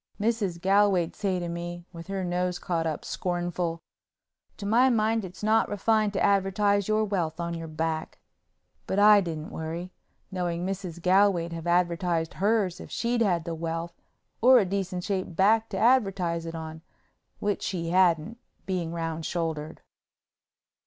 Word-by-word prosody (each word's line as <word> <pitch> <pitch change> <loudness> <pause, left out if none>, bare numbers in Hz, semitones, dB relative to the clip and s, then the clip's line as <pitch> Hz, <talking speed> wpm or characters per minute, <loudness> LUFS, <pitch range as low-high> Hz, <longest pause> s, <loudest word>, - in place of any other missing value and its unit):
Mrs. 205 -5 0
Galway'd 190 -2 +3
say 195 -3 -1
to 175 -1 -3
me, 170 0 -5
with 165 0 -9
her 195 -1 -3
nose 180 0 -1
caught 165 -2 -2
up, 155 - -4
scornful, 175 -2 -2 0.7
"To 200 - -7
my 240 +5 +4
mind 225 -1 +1
it's 185 +2 -9
not 220 +1 +3
refined 210 0 +1
to 195 - 0
advertise 200 0 +2
your 215 0 +2
wealth 175 -6 -2
on 170 0 -2
your 165 -1 -5
back." 160 0 -3 0.7
But 190 - -1
I 205 0 +7
didn't 160 -4 -5
worry, 165 +3 -5 0.4
knowing 175 -2 -2
Mrs. 185 -3 -4
Galway'd 185 -3 +3
have 165 0 -6
advertised 170 -1 +1
hers 200 -3 +1
if - - -10
she'd 235 0 -1
had 175 -7 +1
the 170 - -3
wealth 165 +1 -4 0.5
or 255 +2 +8
a 215 - +4
decent 185 -1 -3
shaped 185 -3 -3
back 220 +4 +3
to 195 - -4
advertise 195 -8 +2
it 165 - -6
on, 160 0 -7 0.6
which 205 -1 -1
she 170 -3 -3
hadn't, 180 +4 +2 0.3
being 180 -4 -2
round 165 -1 -3
shouldered. 160 -3 -3
180 Hz, 155 wpm, -27 LUFS, 170-205 Hz, 0.7 s, or